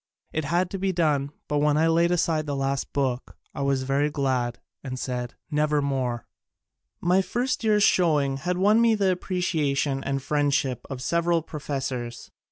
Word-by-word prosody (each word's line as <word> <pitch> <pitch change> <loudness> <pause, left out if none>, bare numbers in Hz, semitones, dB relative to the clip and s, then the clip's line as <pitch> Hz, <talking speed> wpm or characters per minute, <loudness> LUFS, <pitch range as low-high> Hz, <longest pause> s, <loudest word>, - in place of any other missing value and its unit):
It 160 -1 -1
had 175 +4 0
to 195 - -4
be 190 0 +1
done, 150 -6 +1 0.2
but 150 0 0
when 150 0 +3
I 160 - +3
laid 165 +1 +3
aside 160 -3 +1
the 145 - -2
last 135 0 -1
book 130 -3 -2 0.2
I - - -5
was 140 -1 +1
very 140 +3 +1
glad, 130 -4 -1 0.2
and 130 -2 -5
said, 125 -1 -4 0.2
"Never 150 0 +2
mere 130 -4 -1 0.4
!" - - -56
My 190 +1 +5
first 240 +7 -2
year's 210 -2 +3
showing 150 -8 +3
had 180 +6 -2
won 210 +4 +4
me 230 -1 +4
the 195 -3 +2
appreciation 155 -7 -1
and 135 0 -1
friendship 140 -3 0
of 130 -2 -5
several 170 0 +1
pro 155 -1 -7
fessors. 130 -4 -4
145 Hz, 175 wpm, -25 LUFS, 135-175 Hz, 0.4 s, My